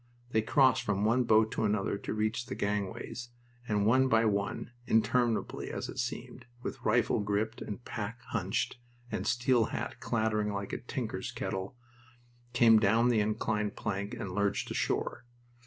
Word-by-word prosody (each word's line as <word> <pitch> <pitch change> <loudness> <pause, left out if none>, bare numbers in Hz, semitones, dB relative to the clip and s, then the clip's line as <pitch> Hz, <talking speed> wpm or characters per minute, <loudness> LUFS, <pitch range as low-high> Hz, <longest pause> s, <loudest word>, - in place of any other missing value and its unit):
They 110 - +3
crossed 130 +2 +4
from 105 -4 0
one 120 +3 +3
boat 110 0 +4
to - - -1
another 105 -2 +1
to 100 - -4
reach 110 +3 -1
the - - -4
gangways, 105 +4 -3 0.4
and 105 -2 +1
one 130 +4 +5
by 115 -2 +4
one, 100 +2 -1 0.2
interminably 115 +1 +1
as - - -4
it - - -6
seemed, - - -4 0.2
with 130 - -5
rifle 115 +1 +2
gripped 105 +2 -1
and 110 +3 -6
pack 110 +2 -4
hunched, 95 +7 -1 0.3
and - - -2
steel 125 -2 +3
hat - - -4
clattering 110 -2 0
like 100 -1 -4
a - - -2
tinker's - - -4
kettle, 95 +5 -4 0.7
came 115 -2 +6
down 115 +4 +4
the 115 -3 +3
inclined 105 0 0
plank 100 -1 -3
and 95 - -5
lurched 100 +1 0
ashore. - - -1
110 Hz, 155 wpm, -31 LUFS, 105-120 Hz, 0.7 s, came